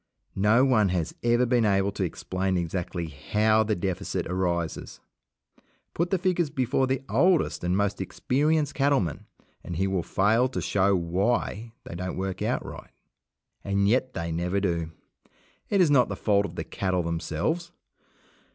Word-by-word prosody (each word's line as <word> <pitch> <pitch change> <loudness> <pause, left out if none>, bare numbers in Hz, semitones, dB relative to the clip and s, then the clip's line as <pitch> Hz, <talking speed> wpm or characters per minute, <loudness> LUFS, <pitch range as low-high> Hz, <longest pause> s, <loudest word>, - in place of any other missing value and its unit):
No 110 +6 +5
one 110 -7 +3
has 85 -3 -1
ever 120 +1 +3
been 120 -1 +2
able 100 -1 +2
to 100 - -3
explain 95 +2 -2
exactly 85 0 -3
how 105 +10 +1
the 110 -1 0
deficit 95 0 -3
arises. 85 -3 -2 0.9
Put 170 +2 -1
the 190 - +2
figures 175 -3 0
before 130 0 0
the 130 +1 -1
oldest 180 - +2
and 90 +2 +1
most 100 0 0
experienced 145 +2 0
cattleman, 135 - 0 0.4
and 90 - -6
he 95 +4 0
will 95 -2 0
fail 110 +8 +2
to - - -3
show 100 0 +2
why 100 +5 -1
they - - -9
don't 90 +2 -4
work 95 0 -3
out - - -1
right. - - -9 0.7
And 100 0 +1
yet 130 +4 +1
they 85 -2 -3
never 90 +4 -1
do. 85 -4 -1 0.8
It 200 -2 +3
is 165 -5 +4
not 130 -4 +4
the - - -3
fault 100 -1 +1
of - - -12
the - - -3
cattle 95 -2 -1
themselves. 85 - -2
100 Hz, 160 wpm, -26 LUFS, 90-125 Hz, 0.9 s, No